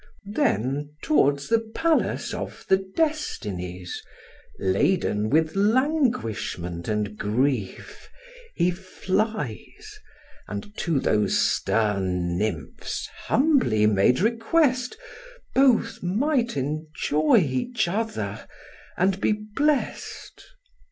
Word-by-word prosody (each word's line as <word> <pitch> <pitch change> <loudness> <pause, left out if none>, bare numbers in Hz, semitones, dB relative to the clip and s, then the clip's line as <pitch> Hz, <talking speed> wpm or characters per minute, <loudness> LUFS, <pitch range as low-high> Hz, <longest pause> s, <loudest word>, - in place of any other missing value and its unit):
Then 145 - 0
towards 140 -1 +2
the 230 0 +3
palace 310 +9 0
of - - -6
the 190 0 +3
Destinies, 95 - -2 0.6
Laden 105 - +1
with 160 - +2
languishment 195 - 0
and 105 -1 -1
grief, 110 0 -2 0.5
he 175 0 +2
flies, 195 - -3 0.5
And 210 -1 -7
to 165 -6 0
those 105 -5 +2
stern 95 -5 +1
nymphs 85 -9 -3 0.2
humbly 260 - +3
made 105 - +3
request, 250 +4 +1 0.6
Both 245 -4 +3
might 235 - 0
enjoy 155 - +1
each 180 - 0
other, 220 +5 -3 0.5
and 190 +2 +1
be - - +3
blest. 230 +8 -2
170 Hz, 85 wpm, -25 LUFS, -, 0.6 s, the